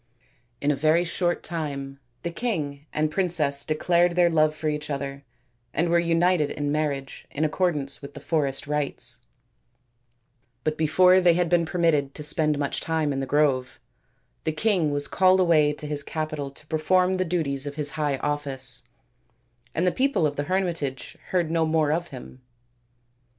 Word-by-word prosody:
In 145 - +2
a - - +1
very 155 +5 +3
short 175 0 -1
time 140 -4 -4 0.2
the 170 - -2
king 155 -10 -3
and 155 0 0
princess 155 -6 +1
declared 170 +2 +2
their 175 -1 +4
love 155 -1 +3
for 155 0 -4
each 150 0 -2
other 140 -1 -4 0.5
and 170 +1 +1
were 170 0 +4
united 170 -2 +2
in 145 -1 -2
marriage 145 -3 -3
in 155 +2 -1
accordance 150 -4 -1
with 140 0 -10
the - - -7
forest 140 -5 -1
rites; 130 -5 -1 1.4
but 155 0 0
before 180 +4 +5
they 175 -2 +5
had 175 -1 +1
been 170 -1 +2
permitted 155 -5 +1
to 150 - -6
spend 150 0 +2
much 140 -1 -2
time 160 -3 0
in 135 - -2
the 135 - -3
grove, 135 -3 +1 0.6
the 160 - 0
king 170 0 +1
was 145 0 0
called 185 0 +4
away 160 -5 +4
to 150 - -7
his 145 -1 -2
capital 155 -2 -4
to 140 +2 -14
perform 180 +4 +2
the 185 - +1
duties 150 -6 -1
of 145 - -5
his 150 -2 -3
high 145 -2 -1
office, 135 -3 -3 0.9
and 170 - +1
the 180 - +3
people 265 - +1
of 145 -1 -1
the 145 - -2
hermitage 170 -8 -2
heard 175 -3 0
no 165 -1 +2
more 155 -2 +2
of 170 +2 -1
him. 130 -1 -11
155 Hz, 170 wpm, -25 LUFS, 145-170 Hz, 1.4 s, before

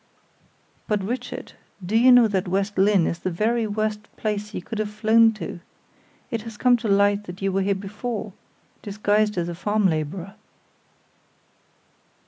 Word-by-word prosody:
"But, 210 -2 0
Richard, 245 +4 -5 0.3
do 205 +5 -2
you 245 +3 +6
know 245 -2 +7
that 195 -3 -1
West 195 +3 -1
Lynne 195 -2 +4
is 170 - -2
the - - -2
very 220 +6 0
worst 215 0 -2 0.2
place 210 -1 -3
you - - -4
could 215 +5 -6
have 215 -1 -1
flown 220 +2 +4
to? 215 -4 -7 0.7
It 230 -2 -2
has 225 -1 -9
come 250 +1 +4
to 225 -1 -4
light 200 +1 +3
that 180 +1 -9
you 195 - +1
were 195 +1 0
here 200 +1 +1
before, 210 +2 -5 0.5
disguised 210 0 0
as 170 -1 -1
a 175 - -4
farm 205 +4 0
laborer." 170 +4 -3
210 Hz, 160 wpm, -23 LUFS, 195-220 Hz, 0.7 s, know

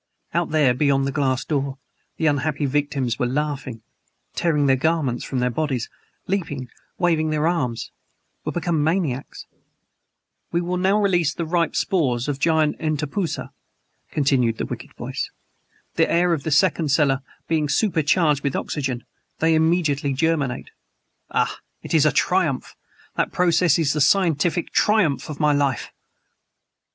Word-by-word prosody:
Out 170 +1 0
there, 150 -5 +3
beyond 135 +1 +2
the 140 - -1
glass 135 -2 0
door, 140 -2 -2 0.4
the 160 - -1
unhappy 145 0 +1
victims 140 -4 -1
were 125 - +1
laughing 135 -4 -3 0.5
tearing 150 -4 +1
their 135 -1 +4
garments 145 -3 0
from 135 - -4
their 125 0 +1
bodies 130 -3 -2 0.3
leaping 145 -10 -3 0.3
waving 160 -3 +1
their 155 +1 +1
arms 130 -10 -1 0.5
were - - -2
become 170 -3 0
MANIACS! 155 -6 -2 1.1
"We 170 - +1
will 175 +1 -2
now 190 +3 +2
release 175 -6 +2
the 170 - -3
ripe 170 -1 0
spores 130 -10 0
of 145 -2 -2
giant 160 -1 +2
entpusa," 155 +3 -2 0.6
continued 130 -6 +1
the - - -2
wicked - - -7
voice. - - -4 0.6
"The - - +2
air 175 0 +3
of 155 - -1
the 160 - -3
second 155 0 +2
cellar 135 -1 +2 0.3
being 155 -3 0
super 175 +1 +2
charged 150 -2 +2
with 140 - -1
oxygen, 130 -5 -3 0.3
they 160 0 +2
immediately 160 -3 +2
germinate. 145 -3 -1 0.6
Ah! - - 0 0.2
it - - -5
is 155 -2 +5
a - - +4
triumph! 175 -8 0 0.4
That - - 0
process 175 -2 +3
is 155 -4 +1
the 150 - 0
scientific 170 +1 +2
triumph 205 -12 +2
of 150 - -6
my 150 -1 +3
life!" 140 -4 0
150 Hz, 145 wpm, -22 LUFS, 135-165 Hz, 1.1 s, is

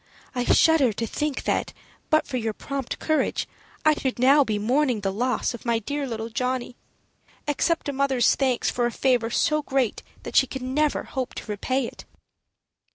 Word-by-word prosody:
I 245 -2 -1
shudder 320 -7 +5
to 230 - -2
think 295 +4 -2
that, - - -1 0.4
but 310 0 +3
for 260 - -3
your 225 -2 -2
prompt 275 +2 -4
courage, 310 -1 0 0.4
I 310 - +6
should 265 -3 -2
now 275 +4 +6
be 215 -5 -1
mourning 245 +2 +1
the 195 -1 -1
loss 250 +5 0
of 235 - -9
my 235 -2 +1
dear 285 +5 -3
little 225 -1 -4
Johnny. 250 +1 -2 0.7
Accept 325 +3 0
a 285 - -1
mother's 265 -3 +3
thanks 260 -3 +1
for 240 -1 +1
a - - -3
favor 245 -2 +1
so 305 +5 +2
great 265 -5 0 0.2
that - - -7
she 265 - +6
can 255 0 -5
never 300 +1 +1
hope 260 -2 -4
to - - -6
repay 245 +5 -1
it." - - -9
255 Hz, 180 wpm, -25 LUFS, 235-285 Hz, 0.7 s, I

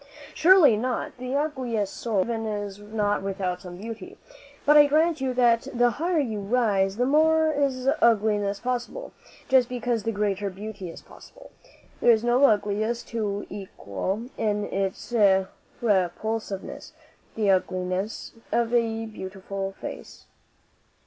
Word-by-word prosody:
"Surely 335 - +6
not. 245 +3 -3
The 255 +1 -3
ugliest 255 -9 -2
soul 220 -5 0
even 225 +2 -2
is 205 -2 -4
not 205 -1 -1
without 190 -2 -3
some 175 -1 -9
beauty. 220 0 -8 0.5
But 295 - +6
I 295 -1 +8
grant 315 +1 +2
you 265 -1 0
that 235 -2 +3
the 240 0 +4
higher 340 +6 -1
you 230 -8 -1
rise 200 -3 +1
the 245 - +2
more 315 +3 +4
is 270 -3 -1
ugliness 210 -3 +2
possible, 250 - -4 0.4
just 255 -2 +4
because 245 -2 -1
the 225 - -2
greater 205 -1 -1
beauty 195 -1 -7
is - - -11
possible. - - -15 0.5
There - - +3
is 225 -1 +5
no 240 +3 +3
ugliness 215 +1 +1
to 205 -3 -2
equal 190 - -5
in 210 -1 0
its 195 +4 -3 0.7
repulsiveness 205 0 -2 0.4
the 210 -3 +2
ugliness 185 +2 -2 0.2
of 235 0 +1
a 225 -1 +1
beautiful 195 -2 -6
face." - - -9
220 Hz, 135 wpm, -25 LUFS, 200-250 Hz, 0.7 s, I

